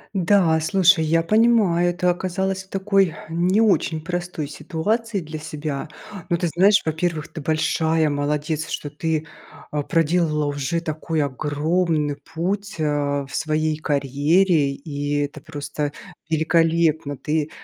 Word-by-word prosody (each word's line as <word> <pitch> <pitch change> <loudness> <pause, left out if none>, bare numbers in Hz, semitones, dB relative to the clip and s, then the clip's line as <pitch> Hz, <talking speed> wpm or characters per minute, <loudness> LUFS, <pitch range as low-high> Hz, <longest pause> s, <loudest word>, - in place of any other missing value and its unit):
Да, 180 -3 +3
слушай, 180 0 +4
я 165 +1 +2
понимаю, 210 -4 +3
ты 180 - -3
оказалось 190 +1 -1
в - - -31
такой 195 -3 +1
не 180 +6 +2
очень 195 -7 +2
простой 175 -2 -4
ситуации 205 +8 -2
для 155 0 -7
себя, 150 -1 -5 0.4
но, 170 - +2
ты 175 - 0
знаешь, 195 +6 +4
во-первых, 160 -1 -2
ты 160 - -7
большая 160 +1 +1
молодец, 150 +2 -1
что 145 - -4
ты, 160 +1 -2 0.5
а, 150 -1 -1
проделала 165 -1 +1
уже 145 +3 -2
такой 155 0 -2
огромный 150 +2 0 0.2
путь, 200 +4 -2
а, 145 -2 0
в 135 - -14
своей 155 -1 0
карьере 145 +2 +2
и 145 0 -3
это 145 +1 -4
просто 145 -1 -4 0.4
великолепно. 160 -2 +2
Ты, 150 +2 -1
160 Hz, 130 wpm, -22 LUFS, 150-175 Hz, 0.5 s, слушай